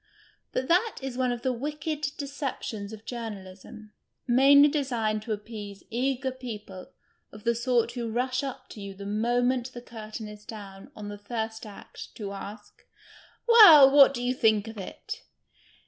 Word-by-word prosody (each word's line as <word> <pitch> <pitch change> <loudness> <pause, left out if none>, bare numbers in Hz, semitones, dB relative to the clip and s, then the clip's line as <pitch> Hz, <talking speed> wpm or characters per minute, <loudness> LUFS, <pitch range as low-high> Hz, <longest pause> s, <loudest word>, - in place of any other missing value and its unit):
But 260 - -2
that 370 +7 +2
is 265 -2 -4
one 255 -1 0
of 240 -1 -5
the 260 -1 +1
wicked 295 +4 -4 0.2
deceptions 275 -7 -5
of 220 0 -11
journalism, 215 -2 -8 0.3
mainly 275 +4 +6
designed 240 -8 -1
to 220 - -7
appease 210 -1 -6
eager 260 +2 -1
people 215 -7 -8 0.4
of 210 0 -13
the 235 - +2
sort 235 0 +1
who 240 -2 -4
rush 255 +3 -1
up 270 -2 -6
to 210 - -10
you 200 -1 -7
the 200 +1 -9
moment 245 +4 0
the 240 - -7
curtain 220 -2 -8
is 210 0 -11
down 200 -3 -10
on 210 -1 -7
the 205 0 -8
First 220 +1 -5
Act 205 - -11
to 205 -3 -6
ask: 200 +3 -10 0.3
"" - - -27
Well, 335 - +10
what 275 -1 +7
do 245 - -4
you 250 +1 +1
think 220 -4 +2
of 225 -1 -8
it 190 - -7
235 Hz, 165 wpm, -27 LUFS, 210-260 Hz, 0.4 s, Well